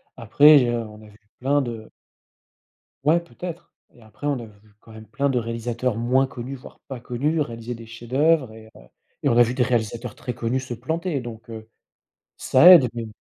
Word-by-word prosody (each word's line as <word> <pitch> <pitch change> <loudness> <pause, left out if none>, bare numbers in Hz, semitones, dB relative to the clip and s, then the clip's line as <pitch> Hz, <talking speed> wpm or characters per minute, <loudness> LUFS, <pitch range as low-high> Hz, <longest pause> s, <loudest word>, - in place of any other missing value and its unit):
Après 145 +6 +6
je 120 -2 +1
on 110 -2 -5
a 110 - -14
vu 105 - -19 0.2
plein 140 +3 +1
de 115 -3 -7 1.1
ouais, 160 +4 +3
peut-être 170 0 -9 0.2
et 120 - -21
après 110 +6 -12
on 140 -3 -1
a 115 - -8
vu 105 0 -20
quand 115 - -18
même 110 0 -12
plein 140 0 -1
de 130 - 0
réalisateurs, 115 0 -3
moins 125 +3 +2
connus, 130 +1 -7
voire 130 - -14
pas 130 -3 -7
connus, 140 +6 -1
réaliser 120 -3 -5
des 115 0 -11
chefs-d'œuvres 130 +3 0
et 110 0 -14
heu, - - -15 0.4
et - - +2
on 120 - +2
a 120 - +8
vu 120 +1 -2
des 125 -1 +1
réalisateurs 120 -1 -2
très 125 -1 -6
connus 120 +2 -2
se 130 -2 -6
planter 160 +5 -3
donc, 115 -2 -10
heu, 110 0 -9 0.7
ça 130 +7 +5
aide 160 -9 +8
mais 115 -1 -5
120 Hz, 200 wpm, -23 LUFS, 115-135 Hz, 1.1 s, a